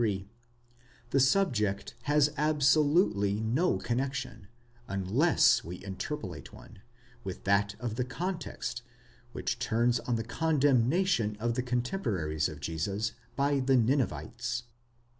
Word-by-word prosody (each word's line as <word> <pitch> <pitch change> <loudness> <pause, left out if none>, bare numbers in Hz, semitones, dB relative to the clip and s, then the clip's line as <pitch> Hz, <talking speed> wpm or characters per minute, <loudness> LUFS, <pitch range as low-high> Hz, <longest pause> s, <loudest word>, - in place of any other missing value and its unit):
33), 100 -3 -1 0.8
the 135 - +3
subject 125 - +1
has 150 0 +3
absolutely 145 - +3
no 125 +11 +1
connexion, 125 -4 -3 0.4
unless 100 - +3
we 85 - -6
interpolate 95 +1 -5
one,' - - -14 0.4
with 95 -3 -6
that 100 +1 +2
of 115 -3 -4
the 125 - +1
context, 150 -3 -4 0.5
which 125 - -3
turns 120 0 +1
on 120 +1 -2
the 115 - -2
condemnation 140 - +2
of 120 +1 0
the 125 - -1
cotemporaries 120 - -1
of 75 - -9
Jesus 95 +8 -2 0.2
by 140 0 +2
the 130 0 +3
Ninevites. 120 - 0
120 Hz, 115 wpm, -30 LUFS, 100-140 Hz, 0.8 s, the